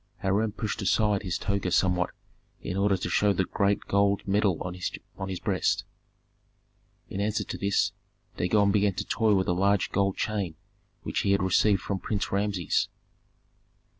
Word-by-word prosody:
Hiram 105 +3 +1
pushed 110 +1 -3
aside 105 0 +2
his 90 -4 -2
toga 100 -2 -1
somewhat 90 0 +2 0.5
in 90 - -5
order 100 0 +2
to - - -3
show 105 -1 +3
the 95 - 0
great 100 +1 +1
gold 100 0 +1
medal 100 -3 +2
on 90 - -4 0.6
his 95 - -4
breast; - - 0 1.2
in 100 - -4
answer 105 +1 0
to - - -6
this 100 0 +1 0.4
Dagon 100 +2 +2
began 100 -2 +2
to - - -3
toy 110 -2 +2
with 95 -1 +1
a 90 - +2
large 100 +2 +2
gold 100 0 +1
chain 100 -7 -2 0.5
which - - -2
he 100 - +2
had 100 - +1
received 95 +1 +3
from 100 -2 -3
Prince 100 +2 -2
Rameses. 100 -3 0
100 Hz, 160 wpm, -27 LUFS, 95-105 Hz, 1.2 s, show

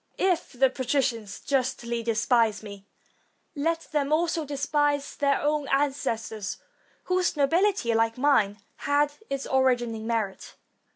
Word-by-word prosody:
If 365 -5 0
the 260 +1 +3
patricians 250 -5 -1
justly 240 -3 -1
despise 225 -2 +1
me, 200 -1 -10 0.7
let 325 +3 0
them 295 -2 0
also 325 0 +1
despise 290 0 0
their 280 -1 +1
own 295 -1 0
ancestors, 265 -7 -1 0.5
whose 365 -3 0
nobility, 330 - +2
like 225 +1 +1
mine, 235 -7 +3 0.2
had 290 +1 +1 0.2
its 275 0 -3
origin 250 -3 +2
in 220 0 -6
merit. 215 -5 -3
270 Hz, 120 wpm, -26 LUFS, 230-290 Hz, 0.7 s, the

